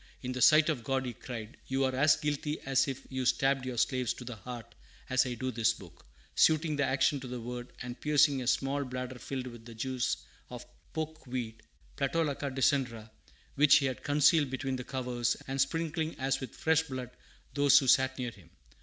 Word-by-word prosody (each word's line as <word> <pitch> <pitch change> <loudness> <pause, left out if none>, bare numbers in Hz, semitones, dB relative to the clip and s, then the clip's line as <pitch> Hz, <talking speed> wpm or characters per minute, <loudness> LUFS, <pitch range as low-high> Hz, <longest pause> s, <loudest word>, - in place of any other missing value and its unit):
"In 125 - -3
the 125 0 -4
sight 155 +4 +7
of 135 -7 -1
God," 130 +2 -1
he 125 - -4
cried, 115 -2 -8
"you 135 +1 0
are 130 -1 +1
as 145 +3 +5
guilty 150 0 -2
as 135 0 +2
if 135 -2 -5
you 130 0 -2
stabbed 135 +1 +2
your 125 -2 -4
slaves 130 0 +1
to - - -9
the 120 -1 -6
heart, 120 +2 -9 0.4
as 130 0 +3
I 125 - -3
do 130 +2 -3
this 115 -1 +2
book!" 85 -9 -15 0.3
suiting 155 -1 +3
the 145 - +1
action 135 +2 +2
to 130 - -8
the 125 0 -5
word, 120 +1 -6
and 125 0 -7
piercing 145 -2 +3
a 125 - -5
small 135 +2 +1
bladder 125 -1 -5
filled 130 0 -4
with 120 -2 -9
the 115 0 -11
juice 130 +2 -1 0.3
of - - -8 0.3
poke 160 -2 -5
weed 120 -3 -4 0.4
(playtolacca 145 0 0
decandra), 130 -4 0 0.4
which 145 +1 +6
he 140 - +4
had 130 -1 -2
concealed 150 0 +4
between 130 0 -2
the 125 - -5
covers, 125 -2 -1
and 135 0 0
sprinkling 160 +3 -1
as 135 +1 0
with 130 - -7
fresh 160 -1 +3
blood 130 -5 -6 0.4
those 140 -1 +6
who 135 - +4
sat 130 +1 +4
near 125 -2 -3
him. 95 -7 -18
130 Hz, 200 wpm, -31 LUFS, 125-145 Hz, 0.4 s, sight